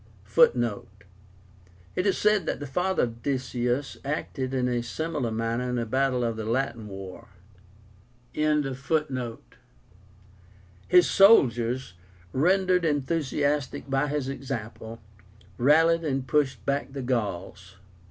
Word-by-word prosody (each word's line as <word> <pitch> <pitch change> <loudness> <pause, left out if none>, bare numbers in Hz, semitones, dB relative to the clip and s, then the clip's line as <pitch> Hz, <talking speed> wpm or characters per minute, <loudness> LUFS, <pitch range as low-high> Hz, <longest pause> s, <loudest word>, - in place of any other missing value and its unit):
(Footnote: 110 -5 +1 0.9
It 180 - 0
is 195 - +2
said 210 -5 +2
that - - -2
the 145 - -5
father 180 +7 0
of 115 -1 -4
Decius 130 0 -2
acted 135 -2 -3
in 130 -2 0
a 120 -1 0
similar 150 +1 -3
manner 115 +2 -2
in 125 - -1
a 120 - -1
battle 130 +1 0
of 115 -1 -1
the 110 - -4
Latin 115 -1 -2
war.) 95 +3 -9 1.1
His 150 -3 +1 2.3
soldiers, 125 - +4 0.4
rendered 180 +4 +2
enthusiastic 145 -2 -1
by 135 +2 +1
his 145 -2 -2
example, 115 -4 -6 0.6
rallied 165 +6 +4
and 135 -4 -1
pushed 145 -2 0
back 140 -1 -1
the 135 -2 -5
Gauls. 95 -5 -3
130 Hz, 115 wpm, -26 LUFS, 115-150 Hz, 2.3 s, soldiers